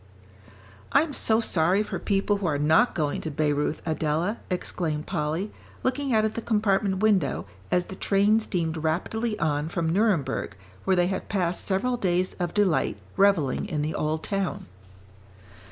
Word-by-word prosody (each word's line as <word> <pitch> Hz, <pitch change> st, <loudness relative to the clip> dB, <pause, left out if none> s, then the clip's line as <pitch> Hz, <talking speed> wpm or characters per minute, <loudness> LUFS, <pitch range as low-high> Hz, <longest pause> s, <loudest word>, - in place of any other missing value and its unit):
"I'm 290 Hz, +2 st, +3 dB
so 220 Hz, -3 st, +3 dB
sorry 185 Hz, -2 st, +2 dB
for -, -, -5 dB
people 200 Hz, 0 st, +1 dB
who 200 Hz, -3 st, -2 dB
are 150 Hz, -3 st, +1 dB
not 160 Hz, +11 st, +3 dB
going 150 Hz, -4 st, -1 dB
to 160 Hz, -, -4 dB
Bayreuth, 150 Hz, 0 st, 0 dB
Adela!" 160 Hz, +6 st, -1 dB
exclaimed 160 Hz, -4 st, -2 dB
Polly, 170 Hz, +3 st, -2 dB, 0.3 s
looking 270 Hz, +1 st, 0 dB
out 220 Hz, -2 st, +3 dB
of 220 Hz, -, -1 dB
the 230 Hz, -, -4 dB
compartment 205 Hz, -3 st, +1 dB
window, 190 Hz, -11 st, +2 dB, 0.3 s
as 180 Hz, 0 st, +2 dB
the 190 Hz, -, -8 dB
train 200 Hz, +3 st, +3 dB
steamed 170 Hz, -7 st, -2 dB
rapidly 210 Hz, +8 st, -1 dB
on 150 Hz, -3 st, 0 dB
from 165 Hz, -1 st, -1 dB
Nuremberg 170 Hz, -, +1 dB, 0.3 s
where 190 Hz, -, +3 dB
they 175 Hz, -1 st, +3 dB
had 190 Hz, +1 st, -3 dB
passed 180 Hz, -3 st, -1 dB
several 230 Hz, +6 st, 0 dB
days 185 Hz, -3 st, 0 dB
of 175 Hz, -1 st, -2 dB
delight 200 Hz, -, +2 dB, 0.2 s
revelling 195 Hz, -7 st, +2 dB
in 150 Hz, -6 st, -2 dB
the 155 Hz, -, -2 dB
old 155 Hz, +1 st, -1 dB
town. 195 Hz, -2 st, -2 dB
185 Hz, 155 wpm, -26 LUFS, 160-210 Hz, 0.3 s, I'm